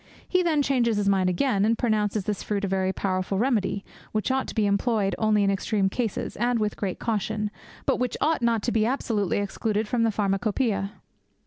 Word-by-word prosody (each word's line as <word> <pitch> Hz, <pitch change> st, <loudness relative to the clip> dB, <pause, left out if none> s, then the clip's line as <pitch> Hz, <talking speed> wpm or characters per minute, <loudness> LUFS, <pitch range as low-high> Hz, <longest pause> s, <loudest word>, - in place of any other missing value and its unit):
He 365 Hz, -, +2 dB
then 315 Hz, -5 st, +2 dB
changes 240 Hz, -5 st, +2 dB
his 205 Hz, -1 st, 0 dB
mind 190 Hz, -2 st, +3 dB
again, 195 Hz, +2 st, +1 dB
and 225 Hz, +2 st, +2 dB
pronounces 215 Hz, -3 st, 0 dB
this 205 Hz, +1 st, -2 dB
fruit 205 Hz, -1 st, -1 dB
a -, -, -1 dB
very 190 Hz, 0 st, 0 dB
powerful 190 Hz, 0 st, -1 dB
remedy, 210 Hz, -4 st, 0 dB, 0.3 s
which 215 Hz, +4 st, 0 dB
ought 265 Hz, 0 st, 0 dB
to -, -, -7 dB
be 215 Hz, -2 st, +2 dB
employed 200 Hz, 0 st, +1 dB
only 215 Hz, -2 st, +3 dB
in 200 Hz, -, +3 dB
extreme 195 Hz, 0 st, 0 dB
cases, 225 Hz, 0 st, -3 dB
and 240 Hz, +2 st, +1 dB
with 210 Hz, -2 st, -1 dB
great 195 Hz, -3 st, -3 dB
caution, 215 Hz, -1 st, -1 dB, 0.3 s
but -, -, +2 dB
which 250 Hz, -1 st, -1 dB
ought 310 Hz, -2 st, +1 dB
not 230 Hz, -2 st, +1 dB
to 240 Hz, -, 0 dB
be 220 Hz, -2 st, +2 dB
absolutely 220 Hz, -, 0 dB
excluded 210 Hz, +1 st, -1 dB
from 240 Hz, +2 st, 0 dB
the 230 Hz, -, +3 dB
Pharmacopoeia. 200 Hz, 0 st, 0 dB
215 Hz, 200 wpm, -26 LUFS, 200-235 Hz, 0.3 s, mind